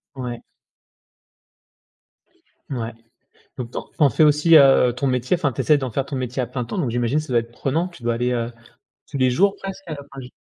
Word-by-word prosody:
Ouais. 125 Hz, -2 st, -5 dB, 2.3 s
Ouais. 115 Hz, -3 st, -3 dB, 0.7 s
Donc 120 Hz, -1 st, -5 dB
tu -, -, -7 dB
en -, -, -1 dB
tu -, -, -30 dB
en 145 Hz, -2 st, +6 dB
fais 155 Hz, -, +3 dB
aussi, 150 Hz, +2 st, +5 dB
heu, 135 Hz, -3 st, +6 dB
ton 135 Hz, +3 st, -2 dB
métier, 125 Hz, +5 st, +1 dB
enfin, 150 Hz, -6 st, 0 dB
tu -, -, -3 dB
essaies 150 Hz, -2 st, +4 dB
d'en 130 Hz, -2 st, -3 dB
faire 135 Hz, +4 st, -1 dB
ton 140 Hz, -, -5 dB
métier 130 Hz, 0 st, -2 dB
à -, -, -1 dB
plein 125 Hz, -3 st, -4 dB
temps, 195 Hz, -, -5 dB
donc 135 Hz, -10 st, -1 dB
j'imagine 120 Hz, +5 st, 0 dB
ça 155 Hz, -5 st, -5 dB
doit 120 Hz, -, +5 dB
être 115 Hz, +1 st, -8 dB
prenant? 160 Hz, +9 st, -1 dB
Tu 170 Hz, -9 st, -15 dB
dois 120 Hz, 0 st, +1 dB
aller, 125 Hz, +2 st, -1 dB
heu, 120 Hz, -1 st, -2 dB, 0.6 s
tous 140 Hz, -, -5 dB
les 130 Hz, -1 st, +3 dB
jours 195 Hz, +9 st, +3 dB
presque? 195 Hz, 0 st, -8 dB
Enfin 145 Hz, -2 st, -6 dB, 0.2 s
j'i 125 Hz, 0 st, -10 dB
130 Hz, 220 wpm, -22 LUFS, 120-150 Hz, 2.3 s, en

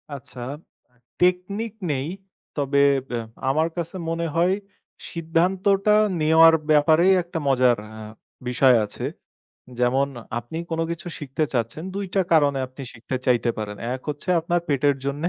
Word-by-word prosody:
আচ্ছা, 125 Hz, -2 st, -11 dB, 0.5 s
আ -, -, -34 dB, 0.3 s
টেকনিক 185 Hz, +5 st, +1 dB, 0.2 s
নেই। 135 Hz, 0 st, -2 dB, 0.5 s
তবে 140 Hz, 0 st, +2 dB, 0.3 s
ব্যা 120 Hz, -1 st, -2 dB, 0.3 s
আমার 155 Hz, +4 st, +2 dB
কাছে 170 Hz, +1 st, -4 dB
মনে 165 Hz, 0 st, -1 dB
হয় 175 Hz, +3 st, +3 dB, 0.6 s
সিদ্ধান্তটা 190 Hz, +5 st, +2 dB, 0.3 s
নেওয়ার 160 Hz, +1 st, +7 dB, 0.2 s
ব্যাপারে 155 Hz, +3 st, +5 dB, 0.2 s
একটা 170 Hz, -1 st, -5 dB
মজার 125 Hz, -3 st, +4 dB
অ্যা 110 Hz, 0 st, -10 dB, 0.4 s
বিষয় 125 Hz, +1 st, +4 dB
আছে। 105 Hz, -, -6 dB, 0.8 s
যেমন 130 Hz, +3 st, +2 dB, 0.3 s
আপনি 120 Hz, +7 st, -7 dB
কোন 165 Hz, 0 st, -1 dB
কিছু 170 Hz, +2 st, -6 dB
শিখতে 145 Hz, +1 st, -2 dB
চাচ্ছেন, 120 Hz, +5 st, -2 dB
২ 200 Hz, 0 st, -3 dB
টা 195 Hz, -, +3 dB
কারণে 145 Hz, -4 st, +4 dB
আপনি 130 Hz, +2 st, -11 dB
শিখতে 120 Hz, +2 st, -5 dB
চাইতে 120 Hz, -1 st, +3 dB
পারেন। 105 Hz, -1 st, -4 dB, 0.2 s
১ 130 Hz, -, -7 dB
হচ্ছে 145 Hz, +4 st, -5 dB
আপনার 175 Hz, +2 st, 0 dB
পেটের 145 Hz, -1 st, +2 dB
জন্যে, 145 Hz, +4 st, -1 dB
150 Hz, 140 wpm, -23 LUFS, 130-170 Hz, 0.8 s, নেওয়ার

